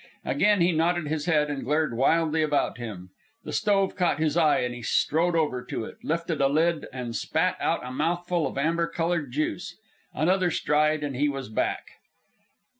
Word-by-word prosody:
Again 205 -2 +3
he 175 +1 +4
nodded 170 0 +1
his 155 -1 -2
head, 150 -3 +2
and 140 -2 -4
glared 150 -2 0
wildly 160 +5 +2
about 145 -4 0
him. 95 -6 -7 0.3
The - - -7
stove 195 -2 +1
caught 175 -6 +1
his 155 -1 0
eye 160 -3 +3
and 125 0 -2
he 120 - -8
strode 165 +8 +1
over 145 -6 0
to - - -4
it, - - -11
lifted 165 -1 -2
a 135 - +5
lid, 160 +3 +1
and 125 -3 -5
spat - - 0
out - - -1
a 125 - -6
mouthful 170 +4 -1
of - - -7
amber 165 +4 +1
colored 165 -5 -2
juice. 155 +6 -3 0.4
Another 180 +3 +1
stride 150 -1 +1
and 140 -3 -3
he 145 +3 +1
was 135 -4 -5
back. 110 - -2
155 Hz, 185 wpm, -26 LUFS, 140-170 Hz, 0.4 s, a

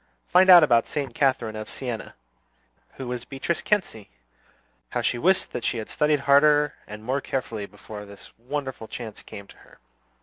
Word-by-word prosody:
"Find 185 +1 +5
out 175 -3 +10
about 120 -5 +3
Saint 140 -5 -4
Catherine 125 -6 0
of 110 0 -6
Siena." 125 -4 -6 0.8
"Who 130 - -7
was 125 -1 -4
Beatrice 135 +6 -3
Cenci?" 185 - -1 0.8
How - - -2
she 120 - 0
wished 185 +7 +2
that 120 - -5
she - - -1
had 110 - -6
studied 150 -2 +1
harder 145 +1 +4
and 105 0 -9
more 130 +4 -1
carefully 115 -7 -4
before 105 0 -10
this 100 0 -13
wonderful 130 -2 -5
chance 110 -3 -8
came 100 - -10
to - - -18
her. - - -20
125 Hz, 170 wpm, -25 LUFS, 110-145 Hz, 0.8 s, out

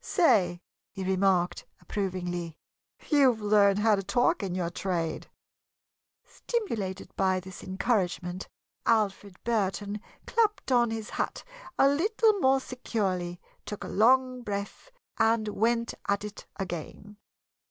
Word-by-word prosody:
"Say," 185 - +3 0.3
he 195 - -6
remarked, 185 -1 +1
approvingly, 175 -4 -3 0.5
"you've 270 -6 +4
learned 205 -1 +4
how 215 +1 +4
to 200 - +2
talk 200 +6 +2
in 190 -3 -3
your 175 -2 -1
trade!" 170 -4 -2 0.9
Stimulated 220 - -4
by 190 -1 +2
this 185 0 -10
encouragement, 185 -3 -1 0.4
Alfred 205 -3 +1
Burton 205 -2 -1 0.2
clapped 420 -9 +1
on 240 -2 +4
his 225 -1 -5
hat - - -3 0.3
a 270 - +6
little 425 +10 +3
more 265 -3 +4
securely, 190 -9 -3 0.2
took 210 - -6
a - - -5
long 255 +3 +3
breath, 205 - -5 0.3
and 225 -1 +3
went 230 +2 +1 0.2
at 200 0 +1
it 210 0 -8
again. 195 +2 -6
205 Hz, 120 wpm, -28 LUFS, 185-235 Hz, 0.9 s, a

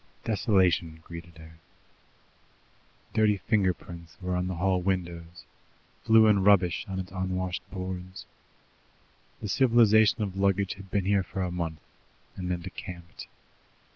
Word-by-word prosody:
Desolation 95 -7 +1
greeted 85 -1 -10
her. 80 0 -14 1.5
Dirty 105 -2 +3
finger 95 0 +2
prints 85 -2 -11
were 90 -1 -2
on 90 0 -1
the 95 - -3
hall 90 +1 +1
windows, 85 -2 -3 0.6
flue 110 -1 +6
and 105 -3 +4
rubbish 90 -4 +3
on 95 -1 -4
its 95 -1 -6
unwashed 95 -1 -2
boards. 95 -1 -6 1.2
The 105 - -4
civilization 110 -3 +4
of 95 -2 -4
luggage 100 0 +1
had 95 -1 -13
been 100 -1 0
here 100 0 +3
for 95 0 -4
a 90 - -2
month, 80 -3 -4 0.5
and 90 -1 -5
then 90 -1 -2
decamped. 90 -1 -9
95 Hz, 135 wpm, -28 LUFS, 90-100 Hz, 1.5 s, flue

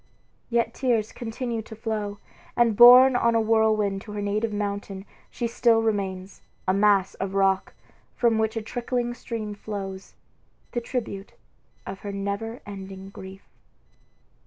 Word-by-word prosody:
Yet 235 -1 +1
tears 230 -5 0
continued 230 -1 -4
to 220 - -9
flow; 215 -2 -3 0.4
and 235 -3 +3
borne 250 +3 +9
on 235 -1 +2
a - - +4
whirlwind 215 -3 +2
to 210 - -9
her 205 - -3
native 210 +2 -1
mountain, 200 -1 -4 0.2
she 240 - -4
still 230 -1 +3
remains, 195 -3 -2 0.3
a 185 - +3
mass 200 -1 +3
of 195 0 -3
rock, 195 -1 +1 0.4
from 230 -2 +2
which 220 +1 0
a 225 - -3
trickling 240 +1 -2
stream 225 -3 -5
flows, 195 -2 -7 0.6
the 240 - -2
tribute 230 -5 -5 0.5
of 190 0 -7
her 205 - -6
never 200 +4 -4
ending 195 -1 -9
grief. 190 0 -11
215 Hz, 140 wpm, -25 LUFS, 195-230 Hz, 0.6 s, borne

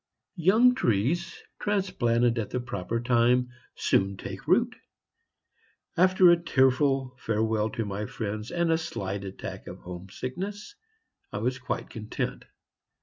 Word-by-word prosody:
Young 220 +9 +6
trees, 165 - 0 0.2
transplanted 120 - +1
at 110 - -3
the 125 - -2
proper 115 -1 -3
time, 125 +1 +3 0.3
soon 95 0 +1
take - - -8
root. - - +3 1.2
After 185 0 +6
a 170 0 +3
tearful 135 -3 +2
farewell 110 -1 0
to 115 0 -3
my 100 +1 -3
friends 105 0 -4
and 170 -1 +1
a 160 - +3
slight 100 - -4
attack 95 -1 -7
of - - -9
home 90 +1 -8
sickness, 195 - -5 0.6
I - - -4
was 125 +2 -1
quite 130 - -4
content. 110 -2 -4
125 Hz, 130 wpm, -27 LUFS, 110-170 Hz, 1.2 s, Young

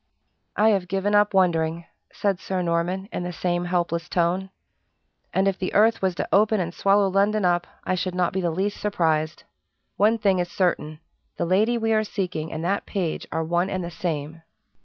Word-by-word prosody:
"I 215 +2 +4
have 195 -4 +1
given 195 +3 -1
up 205 0 +4
wondering," 165 -3 +2 0.3
said 200 -3 -1
Sir 185 -1 -2
Norman, 175 +3 -1
in - - -2
the 180 0 -4
same 175 0 -1
helpless 175 -1 -1
tone. 180 +2 0 0.8
"And 190 +1 +2
if 195 -1 0
the 185 - -3
earth 220 +2 +4
was 190 -2 0
to - - -3
open 215 +1 +4
and 170 -1 -2
swallow 200 +1 +3
London 200 +1 +2
up, 175 0 +1 0.2
I - - -1
should 185 0 -2
not 180 -1 +1
be 190 - -1
the 175 - 0
least 190 +5 -2
surprised. 160 -6 0 0.5
One 220 +3 +4
thing 200 -4 +2
is 175 0 -1
certain: 165 -4 -1 0.4
the - - 0
lady 210 +7 +2
we 225 -1 +1
are 215 0 +3
seeking 180 -6 -3
and 160 +1 -4
that 200 +3 -1
page 180 -5 -3
are 160 - -1
one 175 +3 0
and 185 -2 -2
the 170 - -5
same." 160 -2 -4
185 Hz, 195 wpm, -24 LUFS, 170-200 Hz, 0.8 s, I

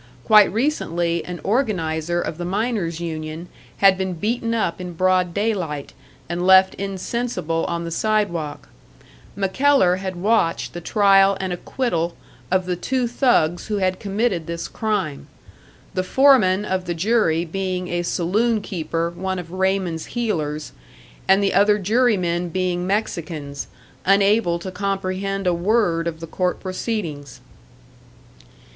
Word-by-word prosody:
Quite 210 -3 +6
recently 175 - 0
an 180 -1 -6
organiser 175 - 0
of 165 -1 -4
the - - -3
miners' 190 -3 -1
union 160 0 -5 0.4
had 190 -1 +6
been 190 -1 -1
beaten 230 +6 -1
up 185 -5 -1
in 180 -1 -6
broad 185 0 +2
day 210 +5 0
light 150 -8 -5 0.3
and 175 +1 -3
left 190 0 +6
insensible 190 -3 -3
on 170 0 -2
the 170 - -5
sidewalk; 175 -6 -1 0.7
MacKellar 195 0 +3
had 190 -1 -4
watched 180 -2 +1
the 175 - -6
trial 195 0 +4
and 190 -1 -2
acquittal 175 -4 -2 0.3
of 185 0 +1
the 180 0 -1
two 255 +6 -1
thugs 230 - +1
who 210 - -1
had 185 -1 0
committed 195 -4 -1
this 170 0 -4
crime 205 -10 -2 0.7
the 185 - 0
foreman 210 -4 +4
of 185 -2 -2
the 175 -1 -3
jury 175 -3 +2
being 185 +1 -3
a 175 0 -1
saloon 210 +7 +1
keeper 165 -3 -3
one 190 +2 -3
of 170 -2 -7
Raymond's 185 -3 -1
heelers, 155 -11 -2 0.6
and 195 +1 +4
the 195 - +1
other 205 +2 +4
jurymen 190 -5 +1
being 180 0 -1
Mexicans, 160 -8 -3 0.4
unable 195 -2 +3
to 185 +2 -7
comprehend 195 0 -2
a 180 - +3
word 175 -2 +1
of 160 -1 -5
the - - -4
court 180 +2 -1
proceedings. 180 - -4
185 Hz, 140 wpm, -22 LUFS, 170-205 Hz, 0.7 s, Quite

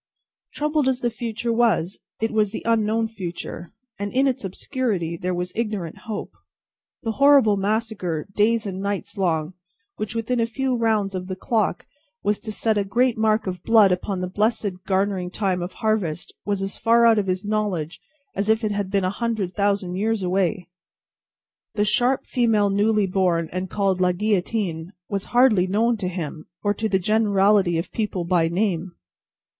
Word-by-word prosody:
Troubled 300 -2 +1
as 255 -1 -1
the 240 - 0
future 230 0 -3
was, 220 -6 +1 0.2
it 225 +1 0
was 215 -2 +2
the - - -6
unknown 225 0 +2
future, 175 -5 -7 0.3
and 200 0 -3
in 265 +2 +2
its 260 -5 0
obscurity 195 - -2
there 180 +1 -3
was 180 +1 -3
ignorant 210 -7 -3
hope. 215 - -4 0.7
The 225 - -1
horrible 275 -4 +5
massacre, 200 -5 -1
days 220 +2 +2
and 190 -1 -4
nights 200 +1 -3
long, 170 -4 0 0.4
which, 215 +1 -4
within 230 +2 -1
a 230 - +2
few 265 +3 -1
rounds 220 -4 +1
of 185 -1 -4
the 185 - -4
clock, 215 -1 -1 0.4
was 205 0 +1
to 220 - -6
set 215 0 +1
a - - +1
great 240 +5 +2
mark 220 0 +2
of 180 -2 -4
blood 215 -3 +5
upon 180 +1 -1
the 180 - -2
blessed 205 -1 -1
garnering 190 -2 0
time 185 -2 -1
of 175 +2 -5
harvest, 200 -7 -1
was 200 -1 0
as 195 - -5
far 235 +1 +4
out 225 -2 +5
of 200 - -2
his 185 +2 -1
knowledge 205 -7 -2 0.3
as 200 +2 -1
if 220 +1 +3
it 215 - 0
had 200 -2 -2
been 195 -1 +1
a 185 - 0
hundred 215 -4 -2
thousand 200 -3 0
years 215 0 0
away. 185 0 0 1.1
The 210 0 +2
"sharp 245 +4 +2
female 220 -5 +2
newly 210 +1 +2
born, 180 -3 +1
and 185 +1 -3
called 195 -3 0
La 180 0 +3
Guillotine," 185 -3 -1 0.2
was 200 -2 -2
hardly 240 -7 +4
known 225 +5 +2
to 195 -3 -3
him, 165 -4 -5 0.2
or 205 -1 +2
to 220 +2 -2
the 190 - +3
generality 200 -2 +3
of 165 - -4
people, 210 -5 -2
by 170 -2 +2
name. 180 0 -1
205 Hz, 175 wpm, -23 LUFS, 185-225 Hz, 1.1 s, horrible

